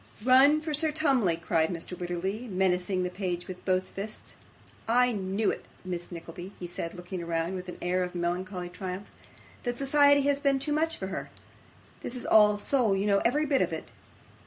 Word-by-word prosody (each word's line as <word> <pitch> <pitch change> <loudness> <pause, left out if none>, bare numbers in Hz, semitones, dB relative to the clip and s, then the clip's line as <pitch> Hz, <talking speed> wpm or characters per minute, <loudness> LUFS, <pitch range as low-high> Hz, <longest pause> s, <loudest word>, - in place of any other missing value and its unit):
'Run 275 +4 +6
for 310 -1 -3
Sir 310 +1 +2
Tumley,' 270 - +2
cried 165 -1 +1
Mr. 175 +1 -5
Wititterly, 185 +6 -3
menacing 185 0 +1
the 180 - -2
page 180 -2 -3
with 185 -1 -8
both 185 -1 +1
fists. 210 +2 -7 0.5
'I 250 +2 +4
knew 200 0 0
it, - - -7 0.2
Miss 175 -1 -4
Nickleby,' 175 +3 -8
he 180 - -5
said, 170 -1 -5
looking 180 0 -6
round 170 +1 -1
with 185 -1 -5
an - - -7
air 180 +1 +1
of 180 0 -3
melancholy 180 +1 -2
triumph, 185 +2 -6 0.5
'that 245 -1 -3
society 285 +1 +5
has 280 0 +2
been 280 -1 +2
too 285 +3 -1
much 320 +2 +1
for 190 - -4
her. 195 - -5 0.7
This 245 - -5
is 250 - -2
all 210 -1 +6
soul, 225 -2 +2
you 195 +1 0
know, 200 -1 +4
every 295 +6 +2
bit 280 -2 +2
of 180 -1 +1
it. 160 - -6
190 Hz, 190 wpm, -28 LUFS, 180-255 Hz, 0.7 s, Run